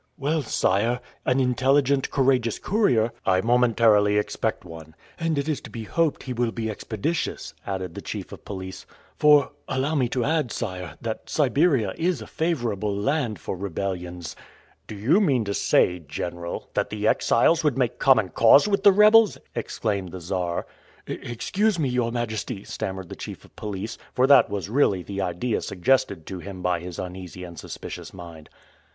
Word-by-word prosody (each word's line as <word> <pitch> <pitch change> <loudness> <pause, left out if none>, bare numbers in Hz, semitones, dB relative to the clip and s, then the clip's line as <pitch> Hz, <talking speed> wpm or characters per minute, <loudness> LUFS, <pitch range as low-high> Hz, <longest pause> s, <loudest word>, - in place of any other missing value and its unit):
"Well, 150 +3 0
sire, 115 0 +1 0.3
an 130 +1 +3
intelligent, 135 +2 +2
courageous 130 -4 +2
courier..." 125 - +2
"I 95 0 +3
momentarily 115 -3 +4
expect 105 - -2
one." 80 -2 -11 0.2
"And 165 -2 0
it 140 +1 -1
is 155 -4 -1
to - - -10
be 115 - -6
hoped 160 +8 0
he 130 - -4
will 120 -1 0
be 110 -1 -3
expeditious," 110 +10 -3
added 95 -3 -3
the - - -7
chief - - -6
of - - -10
police; 95 -1 -7 0.3
"for, 150 -1 +5 0.2
allow 135 +4 -1
me 130 -6 +1
to 125 -1 -1
add, 155 -5 0
sire, 90 -7 -5
that 115 -1 -5
Siberia 140 - +2
is 175 +1 +1
a - - -8
favorable 120 - -1
land 125 -1 0
for 80 - -5
rebellions." 90 -3 -4 0.5
"Do 110 - -7
you 135 - +3
mean 135 - +2
to 100 - -2
say. 90 -2 +2
General, 85 +3 -6
that - - 0
the 105 0 -2
exiles 160 +8 +3
would 150 -4 +1
make 125 -3 0
common 110 -8 +4
cause 115 - +6
with 200 -1 +1
the 200 0 +8
rebels?" 215 +2 +6 0.2
exclaimed 100 -5 -3
the 95 - -7
Czar. 90 0 -2 0.4
"Excuse 190 - -1
me, 145 -5 0
your 125 -2 0
majesty," 115 -2 -3
stammered 95 -2 -5
the - - -7
chief - - -8
of - - -22
police, 105 +1 -5 0.2
for 125 - +4
that 140 0 +6
was 100 -3 -3
really 105 -6 +2
the 100 +1 -4
idea 95 +6 -1
suggested 95 -3 0
to 95 - -6
him 95 0 -8
by 90 -1 +1
his 90 0 -8
uneasy 90 0 -7
and 85 -2 -9
suspicious - - -8
mind. 85 -4 -11
115 Hz, 170 wpm, -25 LUFS, 95-135 Hz, 0.5 s, the